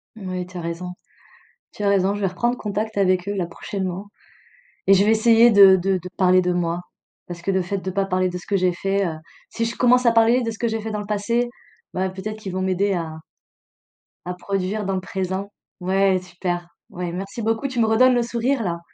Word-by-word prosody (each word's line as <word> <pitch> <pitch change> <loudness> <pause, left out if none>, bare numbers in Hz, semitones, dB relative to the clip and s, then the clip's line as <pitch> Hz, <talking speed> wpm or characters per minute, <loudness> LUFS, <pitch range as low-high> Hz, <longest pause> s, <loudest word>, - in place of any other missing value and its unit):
Moui, 185 -4 -5
tu 185 0 -10
as - - -4
raison. 170 +2 -5 0.8
Tu 210 - -7
as 200 - +3
raison, 195 0 +2
je 205 - -5
vais 195 - +2
reprendre 240 +7 -1
contact 215 0 -3
avec 185 -1 +2
eux, 205 - -1
là, 180 -3 -1
prochainement 190 +2 -5 0.8
et 195 - +7
je 195 0 +5
vais 215 - +4
essayer 230 +1 +6
de 200 -2 +8
de 190 +1 +1
de 180 0 -8
parler 185 -1 +5
de 180 0 0
moi. 175 0 -1 0.5
Parce 175 -1 -7
que 195 - -1
le 190 0 +1
fait 185 +3 -3
de 190 0 -4
pas 195 +1 0
parler 185 -1 0
de 180 - -5
ce 175 - -11
que 200 - +1
j'ai 180 -1 +2
fait, 195 +2 0
heu, 165 -3 -3 0.3
si 230 - -3
je 230 - -3
commence 250 0 +4
à 235 - +6
parler 230 +2 +4
de 230 -1 -2
ce 220 - -9
que 235 - -1
j'ai 225 -1 -2
fait 220 +1 -5
dans 210 - -3
le 205 - -5
passé, 225 +4 0 0.4
bah, 190 +1 -1
peut-être 210 +3 -6
qu'ils 195 -3 -6
vont 185 - -2
m'aider 190 +2 +1
à 160 -3 -4 1.0
à 180 - -3
produire 195 +2 -3
dans 195 - -1
le 185 - -2
présent. 190 +1 -4 0.3
Ouais, 190 +1 +2
super, 175 -1 -4 0.2
ouais, 175 -1 -5
merci 195 +6 -5
beaucoup, 225 +5 0
tu 260 -3 -4
me 225 - +4
redonnes 250 +3 +5
le 240 - +2
sourire 235 +2 -1
là. 170 -2 -2
195 Hz, 230 wpm, -22 LUFS, 180-220 Hz, 1.0 s, de